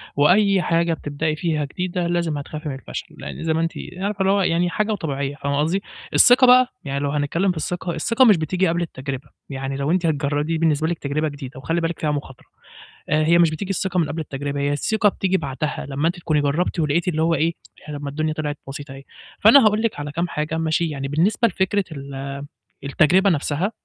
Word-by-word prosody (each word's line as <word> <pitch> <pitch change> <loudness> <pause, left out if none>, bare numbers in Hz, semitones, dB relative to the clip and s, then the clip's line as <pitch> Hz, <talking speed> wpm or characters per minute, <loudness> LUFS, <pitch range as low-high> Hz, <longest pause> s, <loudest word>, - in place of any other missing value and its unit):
وأي 190 +6 +4
حاجة 170 -1 +1
بتبدأي 150 +1 -2
فيها 155 -2 -1
جديدة 180 +3 -3
لازم 170 -3 0
هتخافي 150 +2 -6
من 135 - -4
الفشل، 135 - -8
لإن - - -7
زي 160 -1 +1
ما 160 - 0
أنتِ 165 0 0 0.3
عارفة 200 +2 -3
اللي 190 0 +3
هو 200 - +3
يعني 175 -1 +1
حاجة 215 +4 -1
وطبيعية 140 -7 -3
فاهمة 140 -1 -2
قصدي؟ 170 +6 +1 0.3
الثقة 250 +1 +7
بقى، 250 0 +7 0.2
يعني 140 -1 -3
لو 140 0 -1
هنتكلّم 150 +6 0
في 180 - -6
الثقة، 175 +2 -3
الثقة 230 - +3
مش 210 -7 +6
بتيجي 180 +4 0
قبل 170 +1 0
التجربة، 135 -3 -5 0.2
ي 135 - -5
عني 135 0 -4
لو 140 +2 -1
أنتِ 180 -1 +1
هتجر 145 -2 0
دي 165 +2 -1
بالنسبة 160 -1 +1
لِك 170 -1 -2
تجربة 150 +2 -1
جديدة 135 -3 -8
وخلي 165 +4 -1
بالِك 165 +1 -2
فيها 150 - 0
مخاطرة، 140 -3 -6 0.6
آآ 155 +1 +3
هي 170 +2 +5
مش 170 -2 +5
بتيجي 185 +5 -5
الثقة 190 -1 -1
من 165 - +1
قبل 160 - -4
التجربة 140 -1 -4
هي 145 0 0
الثقة 210 +8 +2
بتيجي 190 -1 0
بعدها، 145 0 -4
لمّا 145 +3 0
أنتِ 175 - -1
تكونِي 155 -3 +1
جرّبتِ 155 +5 0
ولقيتِ 155 +3 +1
اللي 160 -3 0
هو 165 +1 +2
إيه، 165 +3 +1 0.3
طب 145 -1 -6
ما 140 - -3
الدنيا 155 +2 -1
طلعت 150 -1 -3
بسيطة 140 +1 -7
أهي، 135 - -11 0.4
فأنا 225 +3 +7
هاقول 215 +1 +3
لِك 230 -9 -1
على 145 0 -5
كام 170 +4 -1
حاجة 155 0 -3
ماشي، 160 +1 0
يعني 140 -2 -4
بالنسبة 185 - +2
لفكرة 195 0 0
ال 140 -1 -6 0.4
التجربة 170 +8 +3
نفْسها 160 +4 0
160 Hz, 215 wpm, -22 LUFS, 145-180 Hz, 0.6 s, الثقة